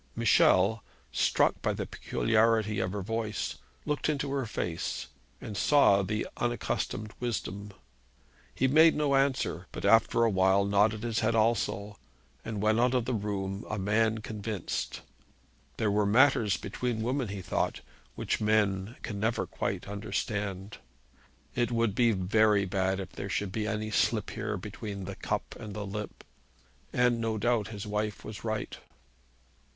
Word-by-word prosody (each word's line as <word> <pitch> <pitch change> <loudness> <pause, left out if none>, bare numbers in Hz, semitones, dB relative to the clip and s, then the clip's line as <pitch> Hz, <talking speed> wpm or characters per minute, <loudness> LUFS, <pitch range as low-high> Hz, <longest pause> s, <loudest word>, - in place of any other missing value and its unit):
Michel, 100 +4 +4 0.3
struck - - +2
by - - 0
the - - -3
peculiarity 110 -2 +1
of 95 -1 -1
her 100 -1 -4
voice, 110 0 -3 0.3
looked 150 0 -1
into 140 -2 -1
her 135 -3 -1
face, 85 -5 -3 0.3
and 105 - -7
saw 100 -6 +5
the 105 +2 -2
unaccustomed 115 -3 -2
wisdom. 105 -4 -3 0.9
He 130 - +2
made 160 +4 +6
no 150 -2 +1
answer, 135 -9 +1
but - - -5
after 115 +3 +4
a 115 - +4
while 95 +1 +3
nodded 105 +2 +2
his 115 -2 0
head 115 +1 +1
also, 105 -2 0 0.4
and 110 -2 -4
went 110 +1 +3
out 125 +1 +3
of 125 -2 +1
the 125 - -1
room 100 -2 -3
a 110 - -2
man 110 +3 +1
convinced. 105 -2 -4 0.8
There 110 -2 +1
were 105 0 +2
matters 115 -2 +4
between 110 +2 -3
women, 125 +1 -1
he 100 -2 -6
thought, - - -1 0.3
which - - -2
men 105 0 +1
can 100 -4 -4
never 110 +3 0
quite - - -3
understand. 100 -1 -3 0.7
It 120 0 0
would 115 -3 +1
be 120 +1 +3
very 105 +1 +3
bad 95 0 0
if 95 -1 -6
there 100 - -6
should 100 0 -1
be 105 +1 -2
any 110 0 -2
slip 105 +1 +1
here 110 -1 -3
between 100 +1 -6
the - - -6
cup - - -3
and 105 -2 -7
the 105 -1 -4
lip; 105 +1 -6 0.7
and, 125 -1 +2
no 110 -1 -1
doubt, 115 -1 +1
his 105 -2 -7
wife 105 0 -3
was 105 -1 -8
right. 110 -1 -3
110 Hz, 155 wpm, -29 LUFS, 100-115 Hz, 0.9 s, made